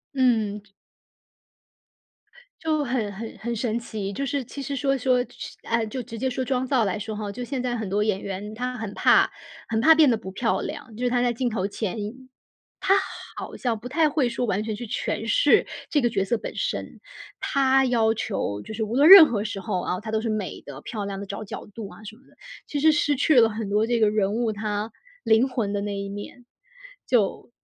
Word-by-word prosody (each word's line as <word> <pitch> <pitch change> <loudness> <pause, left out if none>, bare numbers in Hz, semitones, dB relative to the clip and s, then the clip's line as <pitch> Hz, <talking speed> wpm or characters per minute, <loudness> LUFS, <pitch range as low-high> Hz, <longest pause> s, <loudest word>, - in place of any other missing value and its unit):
嗯。 220 -6 +2
这 210 - -27 1.9
就 310 -2 0
很 240 -6 -1
很 220 +2 -8
很 235 +3 -3
神 225 0 -1
奇， 215 -4 -5
就 275 - -2
是 275 -1 -1
其 275 +4 -8
实 280 +1 -4
说， 275 +1 +1
说 255 0 +2
是 - - -9
呃， 230 -1 0
就 235 +4 -5
直 235 -2 -8
接 260 +3 0
说 255 +1 -2
装 255 0 0
造 255 -4 +2
来 195 +1 -1
说 215 +1 -5
哈， 210 -1 -4
就 245 +4 -6
现 255 +1 -3
在 245 -1 -1
很 220 -4 -4
多 205 +2 +1
演 210 -3 0
员 200 +2 -5
她 250 +1 -3
很 220 -3 -5
怕 - - +4 0.4
很 220 -1 0
怕 320 +6 +8
变 310 -3 +5
得 235 - +3
不 190 -3 -8
漂 225 +4 0
亮， 290 -7 -7
就 250 +3 -3
是 - - +3
她 245 0 +1
在 245 -1 +2
镜 245 +1 -1
头 200 -4 -1
前， 210 0 -4 1.2
她 - - -10 0.2
好 - - -6
像 235 -3 -1
不 240 +3 -8
太 310 +4 +3
会 285 -4 +1
说 240 +1 -2
完 205 -1 0
全 220 -1 -3
去 240 +2 -6
诠 - - -3
释 - - +4 0.2
这 295 - +3
个 240 - +2
角 195 -4 0
色 235 +3 0
本 - - -7
身， - - -3 0.4
她 270 -1 +3
要 230 -3 +2
求 105 - -3
就 - - -9
是 220 - -3
无 220 +3 -3
论 290 +4 +6
任 380 -4 +12
何 215 -6 -2
时 205 -2 -4
候 180 -1 -2
啊， 180 - -2
她 220 +1 -6
都 220 0 0
是 225 - -3
美 215 -3 -3
的， 140 0 -9
漂 210 +3 -5
亮 200 -1 -5
地 200 - -6
找 200 +2 -6
角 200 - -8
度 210 0 -8
啊 - - -14
什 215 +1 -9
么 250 - -23
的， - - -24 0.3
其 290 - -3
实 315 - +6
失 295 -1 +2
去 285 +1 +4
了 225 -2 +6
很 215 -1 -4
多 210 +2 +2
这 240 -1 +1
个 215 - +5
人 205 -2 +1
物， 230 0 0
她 210 +1 -3 0.3
灵 220 +3 +4
魂 230 -6 -2
的 200 - -1
那 205 0 -3
一 200 0 -4
面， 205 +5 -9 0.6
就 230 -1 +1
225 Hz, 245 characters per minute, -25 LUFS, 210-255 Hz, 1.9 s, 任